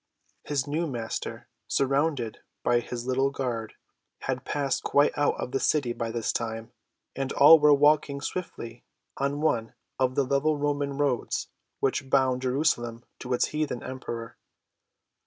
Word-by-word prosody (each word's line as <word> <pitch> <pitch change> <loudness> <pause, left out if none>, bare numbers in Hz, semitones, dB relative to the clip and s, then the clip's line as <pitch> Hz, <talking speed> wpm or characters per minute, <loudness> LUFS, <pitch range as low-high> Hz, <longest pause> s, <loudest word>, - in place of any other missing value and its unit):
His 140 -2 -1
new 155 +4 -1
Master, 120 -5 -5 0.2
surrounded 135 -3 0 0.2
by 120 0 +3
his 120 0 -6
little 130 +1 +2
guard, 120 -5 -4 0.5
had 130 -1 -3
passed 140 -2 -1
quite 145 +1 +3
out 145 0 +1
of - - -4
the 135 - 0
city 135 -6 +1
by 115 -1 -3
this 115 -1 -1
time, 115 0 -4 0.4
and 135 0 -2
all 160 +3 +9
were 150 0 +6
walking 145 0 +4
swiftly 125 -8 -6 0.3
on 140 +2 -1
one 115 -8 0 0.2
of 130 -1 +1
the 140 - +3
level 140 +3 +1
Roman 145 -1 -1
roads 140 -4 -1 0.3
which 135 0 0
bound 130 -2 +3
Jerusalem 125 -3 0
to 130 - -7
its - - +1
heathen 150 -5 -2
Emperor. 120 -3 -6
135 Hz, 145 wpm, -27 LUFS, 120-145 Hz, 0.5 s, all